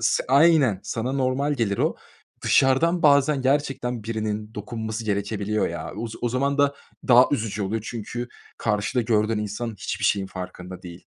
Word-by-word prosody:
s 115 Hz, -, +1 dB
aynen 140 Hz, -, +5 dB
sana 120 Hz, +3 st, -3 dB
normal 135 Hz, +2 st, 0 dB
gelir 110 Hz, -7 st, -1 dB
o. -, -, +1 dB, 0.5 s
Dışarıdan 165 Hz, +6 st, +3 dB
bazen 140 Hz, -1 st, +4 dB
gerçekten 130 Hz, -3 st, 0 dB
birinin 110 Hz, -1 st, -3 dB
dokunması 110 Hz, +1 st, -5 dB
gerekebiliyor 105 Hz, 0 st, -1 dB
ya. 85 Hz, -1 st, -5 dB
O 115 Hz, +3 st, -3 dB
o 120 Hz, -, 0 dB
zaman 140 Hz, +4 st, 0 dB
da 140 Hz, 0 st, +3 dB, 0.3 s
daha 125 Hz, 0 st, +8 dB
üzücü 105 Hz, -6 st, -1 dB
oluyor. 105 Hz, +3 st, -2 dB
Çünkü 120 Hz, +1 st, -5 dB, 0.3 s
karşıda 105 Hz, +3 st, 0 dB
gördüğün 110 Hz, -1 st, +1 dB
insan 105 Hz, +3 st, -3 dB
hiçbir -, -, -4 dB
şeyin 100 Hz, -2 st, +2 dB
farkında 90 Hz, -1 st, -8 dB
değil. 85 Hz, -2 st, -11 dB
115 Hz, 150 wpm, -24 LUFS, 105-135 Hz, 0.5 s, daha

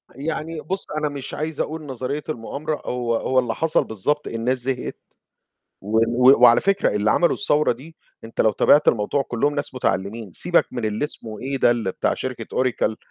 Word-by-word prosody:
يعني 155 Hz, +3 st, -4 dB
بُص، 190 Hz, +4 st, -4 dB
أنا 150 Hz, 0 st, -1 dB
مش 140 Hz, -2 st, -7 dB
عايز 155 Hz, 0 st, -4 dB
أقول 160 Hz, +1 st, -2 dB
نظرية 135 Hz, +2 st, -4 dB
المؤامرة، 150 Hz, +3 st, -4 dB
هو 120 Hz, -2 st, -1 dB
هو 130 Hz, +3 st, +1 dB
اللي 120 Hz, -3 st, -1 dB
حصل 160 Hz, -1 st, +1 dB
بالضبط 145 Hz, +8 st, -2 dB
الناس 115 Hz, +3 st, -1 dB
زهقت، 125 Hz, 0 st, -3 dB, 0.8 s
و 105 Hz, +3 st, -1 dB
و 120 Hz, +3 st, +5 dB
وعلى 120 Hz, -1 st, +7 dB
فكرة 195 Hz, -, +1 dB
اللي 105 Hz, +1 st, +2 dB
عملوا 170 Hz, -, +3 dB
الثورة 150 Hz, -6 st, +2 dB
دي 145 Hz, +7 st, -9 dB, 0.3 s
أنت 115 Hz, -, -2 dB
لو 110 Hz, -, +4 dB
تابعت 145 Hz, +7 st, +4 dB
الموضوع 110 Hz, +5 st, +2 dB
كلّهم 135 Hz, +3 st, -1 dB
ناس 145 Hz, -2 st, -2 dB
متعلِّمين، 105 Hz, -2 st, -2 dB
سيبك 175 Hz, -, +2 dB
من 120 Hz, -3 st, -3 dB
اللي 110 Hz, +4 st, -1 dB
اسمه 110 Hz, -7 st, -5 dB
إيه 135 Hz, +1 st, -3 dB
ده 120 Hz, -6 st, +2 dB
بتاع -, -, 0 dB
شركة 125 Hz, -3 st, -5 dB
أوراكل 120 Hz, -4 st, 0 dB
130 Hz, 180 wpm, -22 LUFS, 115-150 Hz, 0.8 s, وعلى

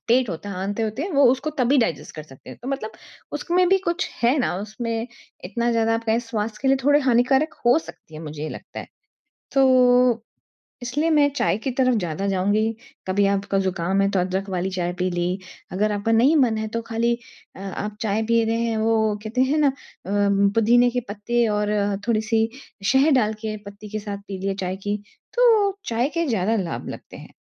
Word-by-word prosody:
पेट 245 Hz, +1 st, +3 dB
हो -, -, -2 dB
आँते 200 Hz, +3 st, -3 dB
होते 220 Hz, +5 st, -2 dB
हैं 375 Hz, -, -3 dB
वो 280 Hz, -1 st, +4 dB
उसको 265 Hz, +4 st, -1 dB
तभी 255 Hz, +3 st, +3 dB
डाइजेस्ट 170 Hz, -, -1 dB
कर 155 Hz, -, -7 dB
सकते 135 Hz, -3 st, -14 dB
हैं। -, -, -11 dB
तो 250 Hz, -, -6 dB
मतलब 270 Hz, -6 st, -3 dB, 0.4 s
उसमें 350 Hz, +4 st, +1 dB
भी 385 Hz, +1 st, +4 dB
कुछ 365 Hz, -1 st, -2 dB
है 240 Hz, +4 st, +4 dB
ना 250 Hz, -, 0 dB
उसमें 225 Hz, +2 st, -4 dB, 0.4 s
इतना 235 Hz, +6 st, -1 dB
ज़्यादा 225 Hz, 0 st, +2 dB
आप 230 Hz, 0 st, -3 dB
कहे 225 Hz, +1 st, +1 dB
स्वास्थ्य 225 Hz, -2 st, -4 dB
के 270 Hz, -, +2 dB
लिए 270 Hz, -, +5 dB
थोड़े 290 Hz, +1 st, +5 dB
हानिकारक 265 Hz, +4 st, +2 dB
हो 240 Hz, -, +6 dB
सकती 165 Hz, 0 st, -13 dB
है 155 Hz, -, -7 dB
मुझे 150 Hz, -1 st, -7 dB
ये 155 Hz, -, -3 dB
लगता -, -, -8 dB
है। -, -, -9 dB, 0.7 s
तो 250 Hz, -3 st, +4 dB, 0.6 s
इसलिए 280 Hz, +7 st, -1 dB
मैं 295 Hz, -2 st, +4 dB
चाय 245 Hz, -, +1 dB
की 260 Hz, +4 st, -3 dB
तरफ 255 Hz, 0 st, +2 dB
ज़्यादा 180 Hz, 0 st, -2 dB
जाऊँगी, 205 Hz, +3 st, +1 dB, 0.4 s
कभी 200 Hz, +2 st, +2 dB
आपका 200 Hz, 0 st, -1 dB
ज़ुकाम 190 Hz, 0 st, 0 dB
है 195 Hz, -, +2 dB
तो 195 Hz, -, +1 dB
अदरक 190 Hz, +2 st, -2 dB
वाली 185 Hz, 0 st, -1 dB
चाय 180 Hz, -1 st, -2 dB
पी 185 Hz, +1 st, +1 dB
ली, 175 Hz, +1 st, -1 dB, 0.3 s
अगर 210 Hz, +3 st, 0 dB
आपका 205 Hz, +2 st, -1 dB
नहीं 245 Hz, +8 st, +4 dB
मन 240 Hz, -6 st, +3 dB
है 220 Hz, 0 st, -2 dB
तो 230 Hz, +2 st, -3 dB
खाली 230 Hz, +1 st, +1 dB, 0.4 s
अ, -, -, -12 dB
आप 200 Hz, +2 st, -5 dB
चाय 215 Hz, 0 st, 0 dB
पी 230 Hz, 0 st, +3 dB
रहे 225 Hz, +1 st, 0 dB
हैं 225 Hz, -1 st, -1 dB
वो 220 Hz, -1 st, +2 dB
कहते 225 Hz, +4 st, -1 dB
है 270 Hz, +4 st, +2 dB
ना? 300 Hz, -2 st, +4 dB
अ, 270 Hz, -, +1 dB, 0.8 s
पुदीने 240 Hz, +2 st, +5 dB
के 250 Hz, -, 0 dB
पत्ते 230 Hz, +3 st, 0 dB
और 210 Hz, -1 st, 0 dB, 0.4 s
थोड़ी-सी 225 Hz, 0 st, +1 dB, 0.4 s
शहद 275 Hz, +3 st, +4 dB
डाल 220 Hz, -4 st, +2 dB
के 215 Hz, -1 st, -2 dB
पत्ती 200 Hz, +1 st, -10 dB
के 215 Hz, +1 st, -3 dB
साथ 205 Hz, -1 st, -5 dB
पी 195 Hz, -, -5 dB
लिया 195 Hz, +1 st, -1 dB
चाय 185 Hz, +1 st, -2 dB
की, 205 Hz, +2 st, -3 dB, 0.4 s
तो 450 Hz, -5 st, +4 dB
चाय 240 Hz, +4 st, 0 dB
के 335 Hz, -, +1 dB
ज़्यादा 220 Hz, -2 st, +1 dB
लाभ 170 Hz, -, -5 dB
लगते -, -, -9 dB
हैं। -, -, -13 dB
225 Hz, 205 wpm, -23 LUFS, 200-255 Hz, 0.8 s, हो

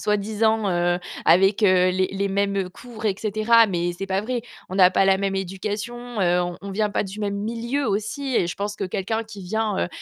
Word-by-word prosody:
soi-disant, 215 Hz, +1 st, +1 dB
heu, 175 Hz, 0 st, +1 dB, 0.3 s
avec 195 Hz, +6 st, +4 dB
heu, 185 Hz, -2 st, +5 dB
les 185 Hz, 0 st, +1 dB
les 195 Hz, +1 st, -2 dB
mêmes 200 Hz, -1 st, 0 dB
cours, 225 Hz, +1 st, -11 dB
et 200 Hz, -3 st, +2 dB
cetera», 220 Hz, +2 st, +4 dB
mais 175 Hz, -1 st, -1 dB
c'est 195 Hz, -, -5 dB
pas 190 Hz, +1 st, 0 dB
vrai. 240 Hz, 0 st, -3 dB, 0.3 s
On 185 Hz, -, -5 dB
a 180 Hz, 0 st, +8 dB
pas 195 Hz, -, +3 dB
la 190 Hz, 0 st, +4 dB
même 195 Hz, -1 st, -1 dB
éducation, 210 Hz, +5 st, -4 dB
heu, 180 Hz, 0 st, +3 dB, 0.2 s
on 200 Hz, 0 st, -7 dB
vient 210 Hz, +1 st, 0 dB
pas 205 Hz, -, 0 dB
du 200 Hz, +3 st, -7 dB
même 200 Hz, -1 st, -2 dB
milieu 235 Hz, +6 st, -2 dB
aussi 220 Hz, +7 st, -2 dB
et 175 Hz, -, +3 dB
je 180 Hz, -, -4 dB
pense 205 Hz, +1 st, -3 dB
que 205 Hz, -, -7 dB
quelqu'un 205 Hz, +4 st, -2 dB
qui 215 Hz, -3 st, -11 dB
vient, 215 Hz, +1 st, -1 dB
heu, -, -, -5 dB
200 Hz, 215 wpm, -23 LUFS, 190-220 Hz, 0.3 s, a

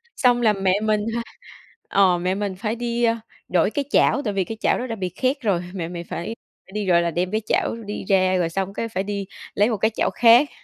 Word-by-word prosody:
xong 245 Hz, -3 st, +3 dB
là 215 Hz, -2 st, +4 dB
mẹ 195 Hz, 0 st, +1 dB
mình 215 Hz, -1 st, +1 dB
ha 235 Hz, -, -1 dB, 0.7 s
ờ 185 Hz, -3 st, +4 dB
mẹ 185 Hz, +2 st, -1 dB
mình 200 Hz, -2 st, -3 dB
phải 215 Hz, +3 st, -2 dB
đi, 240 Hz, 0 st, -2 dB
ơ, 230 Hz, 0 st, +3 dB, 0.3 s
đổi 180 Hz, +2 st, +2 dB
cái 280 Hz, +4 st, -2 dB
chảo 280 Hz, -, +4 dB
tại 210 Hz, -5 st, -2 dB
vì 195 Hz, -1 st, +1 dB
cái 225 Hz, +4 st, -7 dB
chảo -, -, +2 dB
đó 255 Hz, -, -3 dB
đã 230 Hz, -, -3 dB
bị 185 Hz, -3 st, -3 dB
khét 260 Hz, -, -1 dB
rồi, 195 Hz, -6 st, +1 dB
mẹ 175 Hz, -4 st, -3 dB
mình 170 Hz, 0 st, -6 dB
phải 220 Hz, +7 st, -4 dB, 0.4 s
đi, 210 Hz, -1 st, -2 dB
gọi 175 Hz, -2 st, +4 dB
là, 170 Hz, 0 st, 0 dB
đem 180 Hz, +3 st, -1 dB
cái 215 Hz, +1 st, 0 dB
chảo -, -, 0 dB
đi 205 Hz, -, -5 dB
ra 185 Hz, -1 st, +3 dB
rồi 170 Hz, -2 st, +1 dB
xong 195 Hz, +2 st, -3 dB
cái 230 Hz, -, -3 dB
phải 190 Hz, -3 st, -2 dB
đi 200 Hz, -1 st, -3 dB, 0.3 s
lấy 210 Hz, +3 st, +3 dB
một 220 Hz, -, -1 dB
cái 220 Hz, +3 st, +1 dB
chảo -, -, +1 dB
khác. 240 Hz, +5 st, +6 dB
205 Hz, 250 wpm, -23 LUFS, 185-230 Hz, 0.7 s, khác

